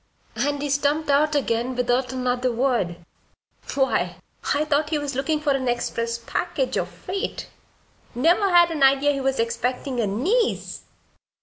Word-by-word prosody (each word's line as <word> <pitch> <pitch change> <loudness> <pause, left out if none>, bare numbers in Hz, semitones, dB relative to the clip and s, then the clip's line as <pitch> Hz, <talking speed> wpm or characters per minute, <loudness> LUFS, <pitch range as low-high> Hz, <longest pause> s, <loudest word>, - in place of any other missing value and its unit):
And 285 +5 -1
he 290 - -2
stumped 290 +2 +1
out 300 +2 +3
again 250 -2 0
without 250 +1 0
another 250 -1 0
word. 230 -9 -1 0.7
Why, 265 -1 +1 0.4
I 300 +1 +1
thought 300 0 +1
he 310 - +1
was 290 -1 -3
looking 300 +4 0
for 300 -1 0
an 270 -2 0
express 235 -1 -1
package, 235 - -2
or - - 0
freight. 385 +1 -5 0.6
Never 345 - +3
had 345 -1 +5
an 310 -3 -3
idea 275 +1 +5
he 275 -1 -2
was 270 -1 0
expectin' 245 +3 -1
a 220 - +1
niece!" 370 - -1
270 Hz, 150 wpm, -23 LUFS, 245-300 Hz, 0.7 s, had